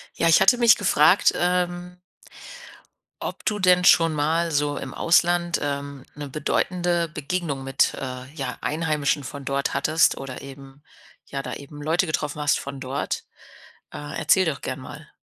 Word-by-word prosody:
Ja, 165 - +1
ich 165 - +5
hatte 240 +6 +5
mich 235 -2 +6
gefragt, 180 -2 +4
ähm 180 0 -1 1.3
ob - - -6
du 210 -1 0
denn 180 -1 +4
schon 165 -2 +5
mal 165 +3 0
so 145 -1 0
im 130 - -7
Ausland, 175 0 +2
ähm, 140 -1 -4
'ne 145 -1 -6
bedeutende 175 +4 -1
Begegnung 150 -2 -4
mit, 135 0 +1
äh, 130 -1 -6
ja, 160 - -5
Einheimischen 150 -2 -1
von 140 +1 -8
dort 140 +1 -1
hattest 155 +4 +2
oder 135 -2 -7
eben 135 0 -12 0.5
ja, 140 0 -5
da - - -5
eben 145 +1 -9
Leute 170 +4 +1
getroffen 150 -1 -3
hast 145 - +2
von 140 0 -7
dort. 130 +2 -4 0.7
Äh, 145 0 -7
erzähl 190 -1 +3
doch 155 -4 -2
gerne 130 +1 -5
mal. 150 +4 -11
150 Hz, 155 wpm, -23 LUFS, 140-175 Hz, 1.3 s, mich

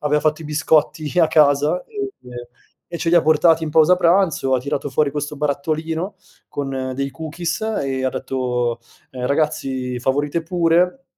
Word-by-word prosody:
aveva 150 0 +1
fatto 155 +1 0
i - - -10
biscotti 155 0 +1
a 160 - +4
casa 150 +2 +3
e 410 -2 -4 0.8
e 170 - -3
ce 165 - -2
li 170 - +3
ha 170 - +6
portati 160 +1 +4
in 155 - -2
pausa 160 +3 +5
pranzo, 170 -7 +2
ha - - +3
tirato 140 +1 -3
fuori 140 +1 +1
questo 150 0 -4
barattolino 160 +5 -2 0.3
con 135 -2 -4
dei 140 +1 -2
cookies 160 +4 -4 0.2
e 130 -1 -2
ha - - +2
detto: 125 -2 -2 0.3
"Uhm, 125 -1 -4
ragazzi 135 -4 -1
favorite 145 +5 0
pure, 175 +8 +1
150 Hz, 160 wpm, -20 LUFS, 135-165 Hz, 0.8 s, ha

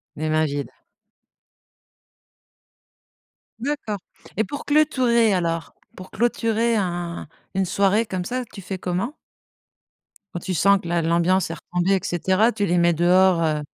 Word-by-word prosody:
Les 155 +1 -3
mains 155 0 +2
vides. 145 -1 -3 2.9
D'accord. 250 -6 -3 0.4
Et 220 - +3
pour 285 +4 -7
clôturer 255 -7 +3
alors, 165 -2 -2 0.2
pour 185 0 -11
clôturer 230 -1 +1
un 175 -4 -3 0.3
une 190 0 +1
soirée 200 +4 +2
comme 185 -4 -4
ça, 250 +4 -2
tu 195 - -9
fais 190 +1 -5
comment? 190 - -2 1.2
Quand 175 - -3
tu 185 +1 -4
sens 200 +4 +4
que 170 - -8
la 170 -1 0
l'ambiance 170 +2 +2
est - - -3
retombée, 180 +3 -1
et - - +1
cetera, 190 +6 +2
tu 205 -3 -1
les 175 -1 +2
mets 170 0 +4
dehors, 175 +1 +4
heu? 155 -2 0
185 Hz, 145 wpm, -23 LUFS, 170-220 Hz, 2.9 s, sens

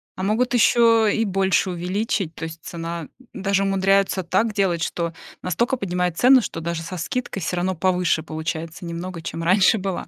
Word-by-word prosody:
А 185 - -5
могут 235 +5 +1
ещё 230 -1 +5
и 225 +2 +1
больше 190 -1 +1
увеличить, 180 0 -2
то - - -8
есть 160 0 -8
цена 165 -2 -5 0.3
даже 195 0 0
умудряются 195 -1 +2
так 215 +6 +1
делать, 185 -5 +1
что 170 0 -2 0.3
настолько 235 - 0
поднимают 180 -6 -2
цену, 255 0 +6
что 165 - -5
даже 165 0 -3
со 185 +2 -6
скидкой 195 +3 -3
всё 175 +2 -2
равно 185 +1 0
повыше 180 -2 +1
получается 160 +2 -5
немного, 170 0 -6
чем 165 0 -5
раньше 190 +5 +4
была. 190 -2 -4
185 Hz, 175 wpm, -22 LUFS, 170-200 Hz, 0.3 s, цену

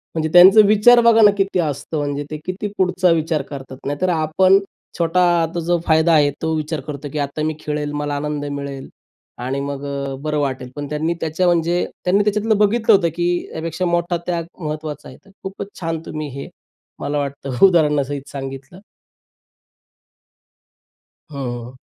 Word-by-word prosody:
म्हणजे 160 -1 -1
त्यांचा 190 +4 +9
विचार 215 +4 +6
बघा 230 -1 +5
ना 210 - +8
किती 195 -2 0
असतं 150 0 -2
म्हणजे 145 0 -2
ते 155 - -3
किती 185 +3 -3
पुढचा 180 -1 +2
विचार 160 -2 0
करतात. 135 -1 -9
नाहीतर 145 +6 -1
आपण 175 +4 +3 0.4
छोटा 170 +2 +2 0.2
आता 165 +1 -2
जो 175 0 +1
फायदा 160 +1 +3
आहे 145 -2 +4
तो 160 0 -1
विचार 155 0 -3
करतो 145 -1 -6
की 150 - -2
आता 145 +2 -3
मी 155 - -2
खेळेल. 150 -1 -3
मला 145 0 -3
आनंद 145 0 -3
मिळेल. 140 -1 -6 0.5
आणि 130 +3 -3
मग 140 0 -5
अ, 140 -1 -4
बरं 150 0 -1
वाटेल. 130 -3 -3
पण 145 -1 -5
त्यांनी 155 +3 -1
त्याच्या 160 +3 -1
म्हणजे 175 +1 +1 0.2
त्यांनी 195 +3 +3
त्याच्यातलं 210 +1 +1
बघितलं 220 +2 +3
होतं 170 -4 +2
की 175 0 0 0.2
त्यापेक्षा 165 +3 -3
मोठा 175 0 0
त्याग 170 -2 -1
महत्त्वाचा 155 -1 -5
आहे. - - -13
तर - - -20
खूपच 195 +1 -6
छान 165 -1 -2
तुम्ही 155 -1 -5
हे - - -7 0.5
मला 145 +1 -2
वाटतं 140 +1 +1
उदाहरणासहित 145 -5 0
सांगितलं. 135 +5 -8 2.5
हं. 125 -2 -6
155 Hz, 160 wpm, -20 LUFS, 145-180 Hz, 2.5 s, त्यांचा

